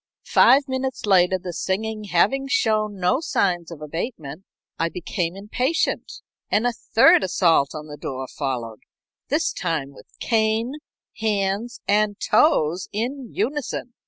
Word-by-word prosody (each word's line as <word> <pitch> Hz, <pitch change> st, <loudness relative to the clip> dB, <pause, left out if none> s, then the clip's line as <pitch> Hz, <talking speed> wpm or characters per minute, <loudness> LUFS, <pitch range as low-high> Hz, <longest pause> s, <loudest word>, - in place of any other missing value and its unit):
Five 265 Hz, +4 st, +5 dB
minutes 260 Hz, -2 st, -3 dB
later 185 Hz, -2 st, +4 dB
the 180 Hz, -1 st, -7 dB
singing 215 Hz, +4 st, -2 dB
having 205 Hz, +9 st, +2 dB
shown 215 Hz, -6 st, +1 dB
no 185 Hz, +8 st, +2 dB
signs 175 Hz, -, 0 dB
of 160 Hz, -3 st, -9 dB
abatement 165 Hz, -, -6 dB, 0.3 s
I 165 Hz, -, +1 dB
became 175 Hz, 0 st, -3 dB
impatient, 250 Hz, +10 st, -2 dB, 0.3 s
and 220 Hz, -, +2 dB
a 245 Hz, -, +1 dB
third 225 Hz, -2 st, +4 dB
assault 165 Hz, -6 st, +2 dB
on 155 Hz, 0 st, -6 dB
the 150 Hz, -1 st, -9 dB
door 130 Hz, -1 st, -5 dB
followed, 125 Hz, -7 st, -4 dB, 0.5 s
this -, -, 0 dB
time 145 Hz, -4 st, -3 dB
with -, -, -16 dB
cane, 225 Hz, +4 st, 0 dB, 0.4 s
hands, 210 Hz, +1 st, -1 dB
and 205 Hz, 0 st, +2 dB
toes 180 Hz, -, +2 dB
in 245 Hz, +4 st, -4 dB
unison. 270 Hz, -3 st, -3 dB
200 Hz, 130 wpm, -23 LUFS, 170-235 Hz, 0.5 s, Five